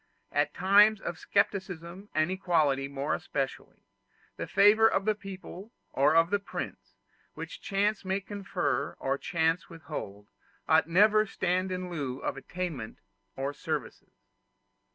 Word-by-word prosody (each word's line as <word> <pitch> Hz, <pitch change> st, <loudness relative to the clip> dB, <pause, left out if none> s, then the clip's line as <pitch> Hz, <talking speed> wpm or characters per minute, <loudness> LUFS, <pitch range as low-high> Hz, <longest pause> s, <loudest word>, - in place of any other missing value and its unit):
At 145 Hz, 0 st, 0 dB
times 205 Hz, +3 st, +5 dB
of 170 Hz, -, -5 dB
scepticism 190 Hz, -1 st, -2 dB
and 155 Hz, +3 st, +2 dB
equality 155 Hz, -7 st, +1 dB
more 140 Hz, +1 st, -2 dB
especially, 135 Hz, -1 st, -4 dB, 0.5 s
the -, -, -5 dB
favor 215 Hz, +2 st, +6 dB
of 195 Hz, -3 st, 0 dB
the 215 Hz, -, +3 dB
people 195 Hz, 0 st, -9 dB, 0.2 s
or 145 Hz, +4 st, +3 dB
of 165 Hz, +2 st, +4 dB
the 205 Hz, -, +2 dB
prince, 200 Hz, -, -7 dB, 0.4 s
which -, -, -8 dB
chance 205 Hz, +1 st, 0 dB
may 190 Hz, +1 st, 0 dB
confer 180 Hz, -9 st, -2 dB
or 135 Hz, +1 st, -1 dB
chance 165 Hz, 0 st, 0 dB
withhold, 105 Hz, -11 st, -7 dB, 0.4 s
ought 160 Hz, -1 st, +4 dB
never 210 Hz, +4 st, +5 dB
to -, -, -14 dB
stand 185 Hz, +1 st, 0 dB
in 180 Hz, -1 st, -4 dB
lieu 140 Hz, -6 st, -3 dB
of -, -, -3 dB
attainments 145 Hz, -5 st, -6 dB, 0.3 s
or 135 Hz, +2 st, -2 dB
services. -, -, -5 dB
175 Hz, 135 wpm, -29 LUFS, 145-195 Hz, 0.5 s, favor